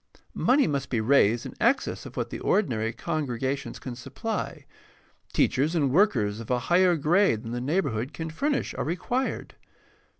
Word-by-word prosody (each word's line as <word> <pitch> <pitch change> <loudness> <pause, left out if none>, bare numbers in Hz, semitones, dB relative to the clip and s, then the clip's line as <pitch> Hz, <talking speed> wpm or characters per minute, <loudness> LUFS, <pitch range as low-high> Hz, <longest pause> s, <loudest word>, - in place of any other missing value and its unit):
Money 275 +3 +3
must 140 -4 -2
be 120 - 0
raised 115 -1 +3
in - - -7
excess 265 +4 +1
of - - -13
what - - -2
the - - -5
ordinary 115 - +1
congregations 135 -1 -3
can 125 -2 -7
supply. 140 - -5 0.7
Teachers 150 +6 +1
and 145 -5 +2
workers 120 - +2
of 115 - -9
a 125 - +2
higher 175 +7 +3
grade 160 - +2
than 115 - -6
the 120 0 -3
neighborhood 135 - -1
can 160 +1 -5
furnish 280 - -1
are - - -3
required. 185 - -2
140 Hz, 160 wpm, -26 LUFS, 120-180 Hz, 0.7 s, Money